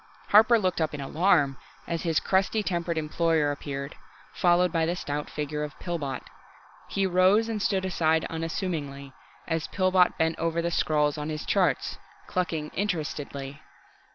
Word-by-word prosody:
Harper 220 +3 +7
looked 185 -5 0
up 155 -2 0
in - - -7
alarm 145 -1 +2 0.3
as 170 -1 -3
his 165 -3 +1
crusty 195 +3 +1
tempered 170 -3 -2
employer 160 -1 +1
appeared, 140 -1 -5 0.4
followed 180 0 +3
by 165 -1 +1
the 170 +2 0
stout 145 -3 -4
figure 150 0 -3
of 150 - -7
Pillbot. 150 -7 -4 0.6
He 195 - 0
rose 190 +4 +4
and 220 -2 -3
stood 195 -2 +1
aside 160 -3 +1
unassumingly, 160 -5 -4 0.3
as 165 -1 -1
Pillbot 185 -1 +3
bent 160 0 0
over 165 0 0
the 170 0 -1
scrawls 150 -3 +1
on 150 +1 -4
his 155 -1 -4
charts, - - +1 0.3
clucking 165 -4 -2
interestedly. 150 -7 -3
165 Hz, 150 wpm, -27 LUFS, 150-185 Hz, 0.6 s, Harper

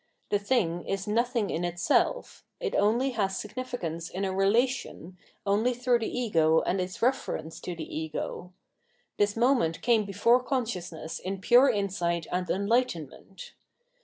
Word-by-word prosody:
The 205 - +3
thing 200 -6 0
is 195 -1 -2
nothing 230 0 0
in 170 - -2
itself; 175 - 0 0.2
it - - -3
only 235 +6 +2
has 195 -5 -1
significance 210 -8 -5
in 195 +2 -3
a 190 - -2
relation, 195 - 0 0.3
only 215 +5 +2
through 245 0 +2
the 225 - -2
ego 165 -10 +2
and 190 - 0
its 185 +4 -5
reference 200 -10 -1
to 180 - -5
the 160 -2 -7
ego. 160 +3 -5 0.7
This 205 +1 +2
moment 235 -9 +2
came 230 -3 +3
before 220 +6 +3
consciousness 185 - -3
in 190 +1 -4
pure 245 +7 +6
insight 180 -6 -1
and 180 0 -2
enlightenment. 195 - -2
200 Hz, 140 wpm, -28 LUFS, 175-240 Hz, 0.7 s, pure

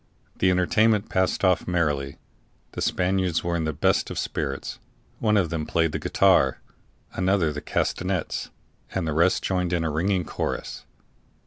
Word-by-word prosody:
The 95 - +3
entertainment 105 +4 +2
passed 95 +1 +1
off 90 -1 +2
merrily. 75 -6 0 0.5
The - - -6
Spaniards 90 -2 0
were 85 0 -1
in 80 -2 -1
the 80 - 0
best 70 - +1
of - - -6
spirits; 70 -3 -3 0.4
one 105 -2 +2
of 90 -5 +1
them 80 -2 -3
played 80 -1 +1
the - - -3
guitar, 65 - +3 0.5
another 90 -4 +1
the 75 - -5
castanets, 90 +3 -2 0.5
and 95 -4 -1
the 80 - -1
rest 85 +4 +2
joined 90 -2 0
in 85 -1 +1
a 80 - -1
ringing 90 +3 0
chorus. - - -4
90 Hz, 155 wpm, -25 LUFS, 80-95 Hz, 0.5 s, The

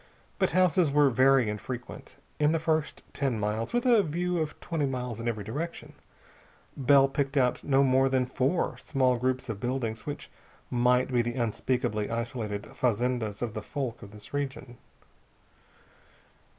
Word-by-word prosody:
But - - +3
houses 180 -1 +3
were 145 -1 +4
very 130 0 +4
infrequent. 120 +4 -6 0.2
In 150 +1 +3
the 165 - +1
first 160 -1 -1
ten 135 -6 -1
miles 105 +2 -2
with 240 +1 0
a 235 -4 +6
view 175 +1 -1
of 155 -1 -3
twenty 160 -4 -1
miles 125 -3 -4
in 115 - -4
every 110 -3 -2
direction 150 +11 -5 0.8
Bell 135 0 +5
picked 140 0 -2
out 125 -2 +2
no 135 -1 +3
more 135 0 +3
than 130 -1 +2
four 135 +6 -1
small 130 -3 +1
groups 130 +1 -1
of 110 -4 -4
buildings 120 -2 -3
which 145 -1 -6 0.4
might 125 +1 +3
be 120 - +4
the 120 +1 -3
unspeakably 115 -2 -1
isolated 115 -3 -3
fazendas 120 -3 0
of 115 -3 -3
the 110 - -4
folk 130 -1 -4
of 100 - -10
this 105 +5 -12
region. 135 -3 -4
130 Hz, 155 wpm, -28 LUFS, 115-145 Hz, 0.8 s, a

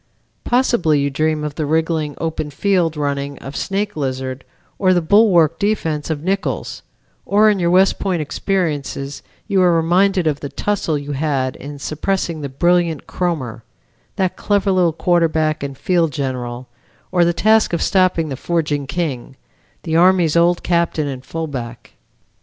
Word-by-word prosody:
Possibly 240 - +2
you 140 0 0
dream 155 +2 0
of 150 -1 -3
the 155 - -3
wriggling 160 -1 0
open 160 -2 -3
field 170 0 0
running 140 -1 -2
of 135 +1 -9
Snake 205 +1 -2
Izard, 130 -2 -3 0.4
or 185 -1 +3
the - - +4
bulwark 170 -3 +4
defense 165 -8 -1
of 155 -2 -3
Nichols; 195 +2 -2 0.4
or 215 +2 +4
in 200 - -1
your 170 -1 +1
West 185 +2 +3
Point 185 -3 -1
experiences 150 -4 -2 0.3
you 195 -3 +2
are 180 -1 +5
reminded 180 +3 +2
of 150 -2 0
the 140 - -6
tussle 195 -6 -1
you 145 0 -6
had 135 -3 -1
in 145 +1 -8
suppressing 160 +2 -2
the 140 - -4
brilliant 170 +2 +1
Kromer, 150 -11 -3 0.5
that 185 -2 0
clever 205 -1 +1
little 180 -3 +3
quarterback 160 -2 +1
and 140 -1 -5
field 170 -4 +1
general, 125 -2 -4 0.4
or 180 -2 +3
the 170 - +3
task 215 +6 +3
of 170 - 0
stopping 185 -4 +2
the 135 - -3
forging 150 -2 -1
King, 140 -6 -3 0.5
the 160 -1 0
Army's 175 -2 +4
old 170 +1 +3
captain 170 -3 +1
and 130 -2 -6
fullback. 135 -8 -6
160 Hz, 155 wpm, -19 LUFS, 145-180 Hz, 0.5 s, are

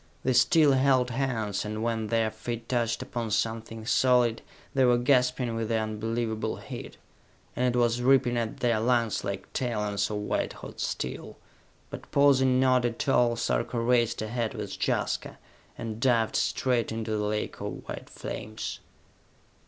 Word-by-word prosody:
They 130 - +2
still 145 +4 +5
held 130 -2 +3
hands, 115 -6 -1
and 110 +1 -4
when 115 -2 -1
their 115 -1 +1
feet 115 +1 -6
touched 120 -2 0
upon 115 -2 -4
something 115 +1 -2
solid, 125 -1 +3 0.3
they 135 - +3
were 125 -1 +5
gasping 125 -1 +2
with 115 -1 -2
the 115 - +2
unbelievable 110 0 -2
heat; - - -9 0.6
and 125 -1 +1
it - - +1
was 120 0 +2
ripping 130 -1 +4
at 115 -2 -3
their 120 -3 +2
lungs 115 -1 +1
like 100 0 -5
talons 105 -5 -1
of 105 - -2
white 105 - -2
hot - - -10
steel. 65 0 -4 0.5
But, - - -8
pausing 130 -2 +4
not 130 -1 +4
at 120 +2 -2
all, 120 -3 +3
Sarka 115 +1 -1
raced 120 -2 +2
ahead 115 +1 -2
with - - -5
Jaska, - - -1 0.4
and 110 -1 -5
dived 115 -3 +2
straight 125 -4 +1
into 110 0 -3
the 105 -1 0
lake 105 0 -3
of - - -6
white - - -7
flames. 110 +1 -6
115 Hz, 155 wpm, -28 LUFS, 110-125 Hz, 0.6 s, still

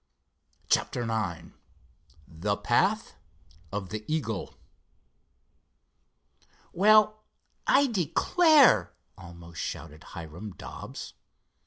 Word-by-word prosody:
CHAPTER 120 - +1
IX 110 -8 -3 0.8
THE 100 +6 -2
PATH 190 - +1 0.6
OF 100 -2 -4
THE 110 0 -5
EAGLE 125 -10 -3 2.2
"Well, 215 +2 +4 0.4
I 280 +1 +5
declare!" 245 - +4 0.2
almost 85 -1 -10
shouted 75 +1 -6
Hiram 85 +5 -9
Dobbs. - - -9
110 Hz, 70 wpm, -28 LUFS, -, 2.2 s, I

